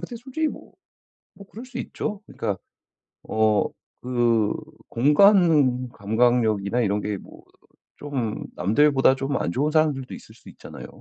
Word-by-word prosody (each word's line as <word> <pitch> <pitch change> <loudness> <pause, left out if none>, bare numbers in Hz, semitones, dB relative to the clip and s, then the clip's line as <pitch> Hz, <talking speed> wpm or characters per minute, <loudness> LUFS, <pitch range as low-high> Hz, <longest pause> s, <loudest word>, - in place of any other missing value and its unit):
근데 240 - -7
솔직히 270 +6 -2
뭐. - - -11 0.6
뭐 200 - -14
그럴 225 +5 -10
수 250 -1 -9
있죠. 210 -4 -5
그니까 105 -4 -4 0.7
어 110 -1 +2 0.4
그 120 -4 +1 0.4
공간 145 - +4
감각력이나 110 -1 +1
이런 105 -2 0
게 105 0 -3
뭐 - - -15 0.6
좀 130 -7 -4
남들보다 135 +8 +3
좀 135 +1 -2
안 80 - -1
좋은 145 - 0
사람들도 150 -5 +1
있을 - - -13
수 - - -15
있잖아요. - - -11
125 Hz, 260 characters per minute, -24 LUFS, 110-155 Hz, 0.7 s, 공간